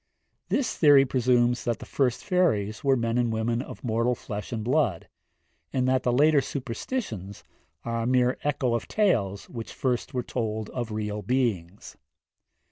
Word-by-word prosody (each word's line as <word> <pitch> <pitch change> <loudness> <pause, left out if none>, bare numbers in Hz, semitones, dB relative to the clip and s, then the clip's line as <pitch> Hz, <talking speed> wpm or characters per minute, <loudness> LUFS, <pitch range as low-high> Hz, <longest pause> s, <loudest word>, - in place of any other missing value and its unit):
This 255 -5 0
theory 145 -3 +6
presumes 125 -1 +2
that 120 -2 -1
the - - -10
first 125 -4 0
fairies 145 - +1
were 135 -1 +4
men 115 -1 0
and 120 -2 +1
women 115 +2 0
of - - -9
mortal 115 +1 +1
flesh 105 -3 -7
and 110 -3 -3
blood, 125 - +1 0.6
and 130 -1 0
that 130 0 +2
the 125 - +1
later 145 +3 +4
superstitions 115 - -5 0.4
are 115 0 -1
a 115 - -1
mere 125 0 +2
echo 135 -4 0
of 120 - -2
tales 105 - +1
which 115 -2 -7
first 125 -2 -2
were 125 -1 -2
told 110 -3 -3
of 120 -3 -4
real 105 -1 -3
beings. 105 -6 -2
120 Hz, 160 wpm, -26 LUFS, 110-130 Hz, 0.6 s, theory